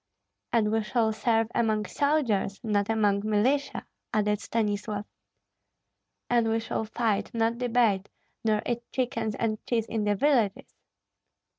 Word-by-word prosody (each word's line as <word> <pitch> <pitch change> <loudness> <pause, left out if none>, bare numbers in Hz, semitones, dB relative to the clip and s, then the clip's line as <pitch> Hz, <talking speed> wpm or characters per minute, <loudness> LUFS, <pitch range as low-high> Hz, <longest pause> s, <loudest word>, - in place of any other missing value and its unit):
"And 215 -3 +2
we 225 0 +2
shall 220 0 +1
serve 225 0 +1
among 215 -2 +1
soldiers, 235 -6 0
not 205 -2 0
among 205 -3 +2
militia," 240 +7 +1 0.3
added 210 -1 +1
Stanislav. 210 -2 -2 1.2
"And 235 -2 +2
we 225 0 +1
shall 225 0 -3
fight, 220 -2 -1
not 230 +1 +1
debate, 230 -5 +2 0.3
nor 215 -1 +1
eat 240 -1 -1
chickens 235 -4 -1
and 215 -1 -2
cheese 230 -3 +1
in 220 -2 -2
the 205 0 +2
villages." 230 -5 +1
220 Hz, 130 wpm, -27 LUFS, 210-235 Hz, 1.2 s, And